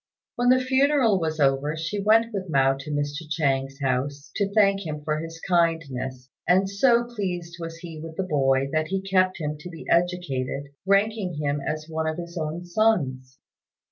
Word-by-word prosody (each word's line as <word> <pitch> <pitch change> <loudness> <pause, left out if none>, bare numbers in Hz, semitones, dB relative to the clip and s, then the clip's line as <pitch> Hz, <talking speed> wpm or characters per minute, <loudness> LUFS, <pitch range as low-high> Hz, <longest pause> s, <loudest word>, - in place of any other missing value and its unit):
When 245 0 +2
the 255 0 +6
funeral 260 -4 +3
was 160 -2 -2
over, 140 +2 +2
she 170 +6 -3
went 225 +3 +4
with 190 -3 -4
Mao 135 -2 +4
to 140 +2 -9
Mr. 145 0 -2
Chang's 135 -3 0
house, 140 +2 -2
to 200 -1 0
thank 200 -2 +3
him 150 -3 -5
for 155 0 -1
his 165 +1 -7
kindness; 140 -7 0 0.2
and 190 +2 +4
so 235 +4 +3
pleased 180 -8 -4
was 165 0 -6
he 165 -2 -9
with 160 0 -8
the 190 - 0
boy 135 -5 +2
that 155 +1 0
he 195 +2 -1
kept 185 -1 +2
him 150 -3 -4
to 175 +3 -8
be 165 -2 -10
educated, 155 -6 0 0.2
ranking 200 -2 +2
him 145 -1 -1
as 155 +2 -3
one 160 0 -2
of 160 +1 -2
his 170 0 -7
own 165 +1 -4
sons. 145 -10 0
165 Hz, 180 wpm, -25 LUFS, 145-195 Hz, 0.2 s, the